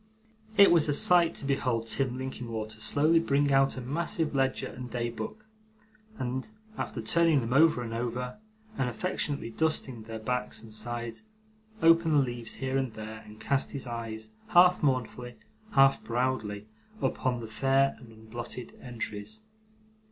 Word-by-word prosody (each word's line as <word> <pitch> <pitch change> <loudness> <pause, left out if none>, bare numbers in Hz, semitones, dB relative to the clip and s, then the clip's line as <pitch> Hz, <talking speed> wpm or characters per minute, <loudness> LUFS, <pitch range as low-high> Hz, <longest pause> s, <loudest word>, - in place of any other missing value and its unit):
It 200 - +8
was 165 -3 +4
a 145 - +2
sight 175 +1 +5
to - - -2
behold 125 -4 0
Tim 125 +2 0
Linkinwater 115 -4 -5
slowly 155 +8 +3
bring 145 -3 +2
out 135 0 +3
a - - -4
massive 155 +4 -1
ledger 135 -1 +1
and 125 0 -7
day 120 0 -2
book, 215 - -7 0.7
and, 130 - -3 0.3
after 115 - -4
turning 165 +4 +4
them 120 0 -2
over 155 -3 +5
and 115 -1 -5
over, 125 - -3 0.4
and 125 - +1
affectionately 140 -3 -2
dusting 135 -4 -1
their 110 +1 -7
backs 125 +1 -2
and 110 -1 -11
sides, 120 +1 -3 0.6
open 165 -1 +5
the - - +5
leaves 120 -4 -1
here 135 0 -1
and 130 -4 -3
there, 110 0 -7
and 105 0 -13
cast 135 +5 0
his 140 -2 -4
eyes, 115 -2 -6 0.2
half 180 +1 +6
mournfully, 125 -3 -1 0.4
half 135 0 +5
proudly, 115 -4 -1 0.3
upon 130 -9 0
the 115 - -6
fair 135 +5 +2
and 120 -3 -14
unblotted 115 +2 -8
entries. 120 - -5
125 Hz, 150 wpm, -29 LUFS, 115-140 Hz, 0.7 s, It